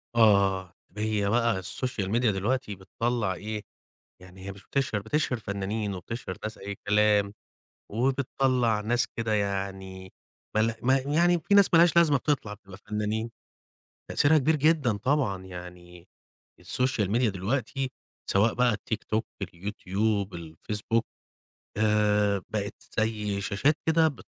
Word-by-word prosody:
آه، 100 -5 +4 0.2
هي 105 -2 0
بقى 115 -4 +2
الSocial 125 -1 -2
Media 120 +2 +1
دلوقتي 105 +1 -1
بتطّلع 110 +1 -2
إيه، 105 +4 -5 0.6
يعني 95 +1 -12
هي 100 - -4
مش 95 0 -15
بتِشهِر 135 -6 -1
بتِشهِر 125 +2 0
فنانين 100 0 -3
وبتِشهِر 95 +1 -6
ناس 110 +1 -5
أي 100 +1 -5
كلام، 105 -1 +3 0.6
وبتطّلع 125 -2 +1
ناس 120 +3 +1
كده 115 -1 0
يعني 95 -2 -3 0.4
مل 110 +1 +2
ما 130 +2 +4
يعني 170 +6 +2
في 200 +6 +1
ناس 200 -1 +7
ما - - +8
لهاش 170 0 +5
لازمة 155 -5 +5
بتطلع 125 -7 -1
بتبقى 95 -2 -14
فنانين، 105 +2 -3 0.8
تأثيرها 155 +2 +4
كبير 155 +4 +2
جدًا 145 -7 +2
طبعًا 110 -7 0
يعني 90 -1 -11 0.5
الSocial 125 -5 +1
Media 115 +2 +2
دلوقتي 125 +7 -2 0.4
سواء 105 +4 +3
بقى 125 -2 +3
التيكتوك، 110 +1 -3
اليوتيوب، 100 +2 -2
الفيسبوك، 105 +8 -3 0.7
آآ، 105 -2 +2
بقِت 105 -2 -2 0.3
زي 105 -2 -1
شاشات 135 +10 +1
كده 160 0 +4
بت 140 -6 -10
105 Hz, 130 wpm, -27 LUFS, 100-125 Hz, 0.8 s, ما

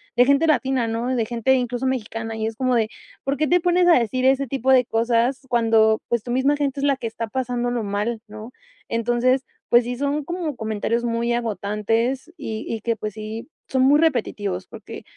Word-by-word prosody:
de 245 - +6
gente 280 +4 +3
latina, 265 -4 +1
¿no?, 235 +3 -1
de 230 - 0
gente 240 +2 +1
incluso 245 0 -1
mexicana, 225 -3 -3
y 220 0 -2
es 225 - -5
como 255 0 0
de: 220 -2 +1 0.3
"¿Por 275 +1 -1
qué 305 - +1
te 355 +5 +4
pones 355 0 +3
a 335 -7 +7
decir 255 +3 -1
ese 270 +1 +3
tipo 265 +1 0
de 255 -1 +5
cosas 235 +3 +1
cuando, 225 -2 +3
pues, 235 -2 0
tu 240 - -5
misma 275 +3 +2
gente 280 -1 -1
es - - -3
la 280 -1 +3
que 235 - -7
está 225 0 -5
pasándolo 245 -1 -2
mal, 210 +3 -2
no?", 215 +2 -9 0.4
entonces, 240 +3 +1 0.2
pues 240 0 +5
sí, 245 +1 -3
son 285 +2 -1
como 340 -3 -4
comentarios 220 +1 -2
muy 235 0 0
agotantes 230 +5 -1
y 220 -1 -5
y 225 -2 -3
que, 230 0 0
pues, 215 -1 -5
sí, 215 +5 -7 0.2
son 260 -1 +1
muy 290 +3 +5
repetitivos 205 - 0
porque, 225 -3 -10
240 Hz, 200 wpm, -22 LUFS, 225-265 Hz, 0.4 s, a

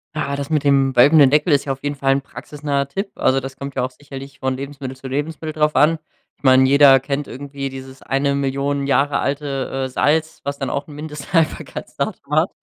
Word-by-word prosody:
Ja, 140 -2 -2
das 140 +1 -5
mit 150 -2 0
dem 135 -1 +3
wölbenden 140 +2 +7
Deckel 150 +3 +3
ist 140 - +3
ja 135 - -3
auf 135 - -5
jeden 145 0 -2
'n - - -22
Fall 135 0 +2
praxisnaher 140 0 -4
Tipp. 195 +6 -4
Also, 135 +1 +2
das 135 0 -7
kommt 140 0 -7
ja - - 0
auch 130 - -2
sicherlich 140 0 -11
von 130 0 -1
Lebensmittel 135 -1 -7
zu 135 - -9
Lebensmittel 155 +3 -3
drauf 150 0 +1
an. 160 +2 +4 0.4
Ich - - -38
meine, 130 0 +6
jeder 140 -1 +7
kennt 140 +2 -3
irgendwie 140 0 -6
dieses 130 0 -10
1.000.000 140 0 -1
Jahre 140 +1 +2
alte, 135 -2 -2
äh, - - -2
Salz, 155 +4 0
was 140 0 -3
dann 135 - -2
auch 140 - -3
'n 145 - -10
Mindesthaltbarkeitsdatum 155 +2 -3
hat. - - +3
140 Hz, 205 wpm, -20 LUFS, 135-145 Hz, 0.4 s, wölbenden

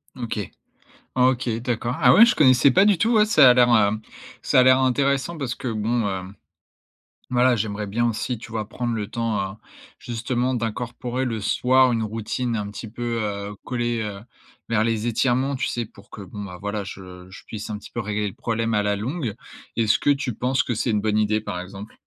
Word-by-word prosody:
OK. 115 -5 -4 0.7
OK, 125 -1 +2
d'accord. 120 +1 -2
Ah 125 -4 +6
ouais, 230 - +9
je 235 - +2
connaissais 130 -2 +5
pas 190 +10 +5
du 200 -5 +3
tout 230 +2 +2
ouais, 215 -1 +5
ça 155 - +7
a - - +7
l'air, 125 -1 +5
hem, 110 0 +2 0.4
ça - - +4
a - - +7
l'air 130 0 +6
intéressant 135 +4 +1
parce 135 -5 -3
que 130 - -6
bon, 110 +1 0
hem, 95 +1 -5 1.0
voilà, 125 0 +4
j'aimerais 105 -1 -3
bien 120 +4 0
aussi 115 +2 -2
tu 110 0 -11
vois 110 -2 -4
prendre 120 0 -3
le 105 -2 -3
temps, 105 -4 -2
heu, - - -14 0.4
justement 120 +2 -2
d'incorporer 120 +2 -3
le 115 -3 -3
soir 130 +4 +3
une 115 -2 0
routine 115 +2 -3
un 105 -2 -3
petit 110 +2 -8
peu, 120 +1 -4
heu, 100 0 -4
collée, 120 -2 -2
heu, 105 -2 -5 0.5
vers 110 -2 +2
les 115 0 -1
étirements. 125 +4 +1
Tu - - -1
sais 120 -1 -2
pour 100 -1 -19
que 105 - -9
bon, 100 +2 -8
bah, 90 -3 -9
voilà 105 0 -3
je 90 -1 -10
je - - -12
puisse 110 0 -6
un 105 - -4
petit - - -13
peu 120 - -4
régler 105 0 -2
le 95 - -7
problème 115 -1 -1
à 105 - +2
la 105 0 +1
longue. 120 - -3 0.4
Est-ce 110 -2 +3
que 145 - +2
tu 135 -5 -1
penses 130 +2 +1
que 120 - -2
c'est 115 +2 0
une 105 -1 +1
bonne 105 0 0
idée 110 0 +1
par 90 -4 -5
exemple? 100 +4 -9
115 Hz, 210 wpm, -23 LUFS, 105-125 Hz, 1.0 s, ouais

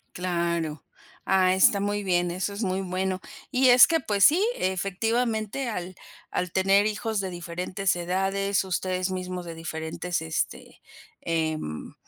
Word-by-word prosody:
Claro, 170 -3 -2 0.4
ah, 185 -1 +4
está 190 +2 +5
muy 205 +1 -1
bien, 175 -2 +1
eso 185 +3 -2
es 205 +3 -4
muy 190 -1 -1
bueno, 185 0 -2 0.3
y 260 0 +3
es 245 0 +9
que, 325 -1 +2
pues 205 -8 0
sí, 345 +7 +5
efectivamente, 220 +6 -1
al 185 -4 -5 0.4
al 180 -1 -2
tener 195 +2 +3
hijos 215 0 -2
de 190 -1 -2
diferentes 180 +2 -2
edades, 195 +3 0
ustedes 185 0 -2
mismos 180 -1 -4
de 170 - -6
diferentes 160 +1 -4
este, 160 -1 -4 0.4
em, 155 - -3
185 Hz, 140 wpm, -26 LUFS, 175-200 Hz, 0.4 s, es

